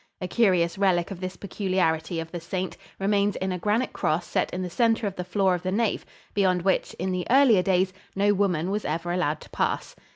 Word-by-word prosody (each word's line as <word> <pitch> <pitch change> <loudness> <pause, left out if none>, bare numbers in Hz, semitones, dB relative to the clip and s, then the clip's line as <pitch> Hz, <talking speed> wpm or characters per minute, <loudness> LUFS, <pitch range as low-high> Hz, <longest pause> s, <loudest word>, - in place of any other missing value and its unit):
A 180 - -3
curious 180 -4 +2
relic 180 -3 +2
of 190 - -6
this 185 0 -5
peculiarity 180 -4 -1
of 165 0 -6
the 175 - -4
saint 180 +2 -4 0.2
remains 200 +1 +1
in 190 0 -2
a 180 - -3
granite 215 +7 0
cross 170 +3 0
set - - -1
in 185 +1 -3
the - - -2
center 225 +1 +2
of 195 -2 -2
the 180 - -4
floor 190 +1 +1
of 175 - -2
the 185 +1 -2
nave, 220 +1 0 0.3
beyond 185 -3 +2
which, 190 0 +1
in 185 +2 -2
the 180 -1 -2
earlier 250 -6 +6
days, 185 0 +1 0.2
no 205 +1 +3
woman 185 -3 0
was 210 +1 -1
ever 165 +3 -2
allowed 165 -4 0
to - - -13
pass. - - -1
185 Hz, 220 wpm, -26 LUFS, 175-200 Hz, 0.3 s, earlier